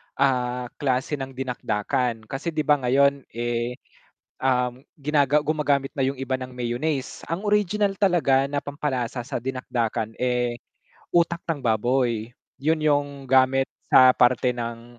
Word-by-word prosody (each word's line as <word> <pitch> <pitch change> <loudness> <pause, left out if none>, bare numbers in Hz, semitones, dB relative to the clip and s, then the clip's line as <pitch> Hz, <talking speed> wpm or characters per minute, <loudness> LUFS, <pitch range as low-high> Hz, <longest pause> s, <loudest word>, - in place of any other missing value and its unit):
ah, 125 -2 0
klase 135 +1 0
ng 135 -1 -6
dinakdakan 125 -2 -2
kasi 155 +5 -4
'di 155 - 0
ba 150 0 +3
ngayon, 140 +1 +2
eh, 120 +1 -2 0.7
um, 125 0 0
ginaga 145 0 +2
gumagamit 145 -3 0
na 135 - +2
yung 135 0 -2
iba 130 0 -1
ng 130 0 -8
mayonnaise, 125 +4 -3
ang 165 +3 -3
original 205 -1 +1
talaga 165 -9 +3
na 140 +1 -2
pampalasa 130 -4 -3
sa 120 - -4
dinakdakan, 120 -3 -2
eh, 125 -1 0 0.5
utak 170 0 +3
ng 155 -5 -2
baboy, 120 0 +1 0.3
yun 155 +3 +1
yung 145 -2 +3 0.2
gamit 130 0 +4 0.2
sa 130 0 +8
parte 125 0 +4
ng 120 0 -6
130 Hz, 135 wpm, -24 LUFS, 125-145 Hz, 0.7 s, sa